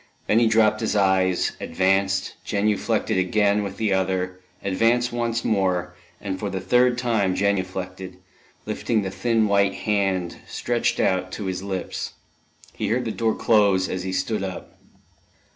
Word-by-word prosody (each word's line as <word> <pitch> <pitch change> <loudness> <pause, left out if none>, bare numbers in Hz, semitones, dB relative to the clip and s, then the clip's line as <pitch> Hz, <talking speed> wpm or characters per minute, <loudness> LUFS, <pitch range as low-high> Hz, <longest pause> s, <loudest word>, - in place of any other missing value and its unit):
Then 110 - +3
he 120 - +4
dropped 110 -1 +3
his - - -1
eyes, 95 -2 +2
advanced, 95 +2 +1
genuflected 105 -2 0
again 100 +2 +2
with 100 -2 -5
the 110 -3 +1
other, 95 -1 -1 0.2
advanced 115 +5 +1
once 115 -1 -1
more, 90 -4 0 0.3
and 95 -2 -4
for 105 - -3
the 95 0 -3
third 125 +6 +3
time 110 -7 +1
genuflected, 95 -2 -2 0.5
lifting 110 -3 -1
the 95 - -3
thin 110 +3 +1
white 100 -1 +2
hand, 95 -4 -1
stretched 120 0 -1
out, 95 0 +1
to 105 - -5
his 95 0 -3
lips. 95 -2 -4 0.6
He - - -3
heard 120 +4 0
the 110 - -2
door 110 0 0
close 100 -4 +3
as 90 - -3
he 95 +1 -4
stood 95 +3 -1
up. 95 -2 -7
100 Hz, 150 wpm, -23 LUFS, 95-110 Hz, 0.6 s, he